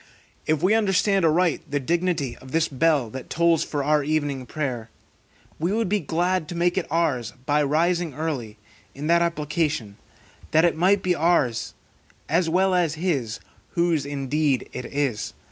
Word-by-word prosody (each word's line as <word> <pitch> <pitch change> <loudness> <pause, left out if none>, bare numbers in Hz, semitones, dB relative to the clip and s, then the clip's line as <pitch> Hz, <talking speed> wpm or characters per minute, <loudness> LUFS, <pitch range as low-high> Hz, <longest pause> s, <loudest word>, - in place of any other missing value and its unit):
If 155 +1 +1
we 190 +4 +4
understand 195 -3 +2
aright 165 +1 +2
the 145 - 0
dignity 165 -3 -1
of 130 0 -13
this 165 0 +2
bell 140 -4 +1
that 130 0 -8
tolls 170 -1 +3
for 145 -2 -3
our 150 0 +2
evening 145 -4 -1
prayer, 125 -7 -3 0.7
we 170 +4 0
would 225 -2 0
be 210 +1 +2
glad 175 +1 0
to 175 - -6
make 175 +1 +1
it 190 - -1
ours 145 -8 0
by 145 +2 +2
rising 165 +1 +1
early, 135 -9 -4 0.4
in 140 +2 -6
that 170 +2 +4
application, 150 -9 -1 0.5
that 160 +2 +4
it 170 - +2
might 190 +4 +3
be 180 - +2
ours 150 -9 +1 0.5
as 165 +2 +1
well 185 +3 +2
as 170 -4 +1
his, 150 -10 -1 0.4
whose 170 -4 +2
indeed 140 0 -1
it 125 - -5
is. 140 -7 -2
155 Hz, 160 wpm, -24 LUFS, 140-175 Hz, 0.7 s, we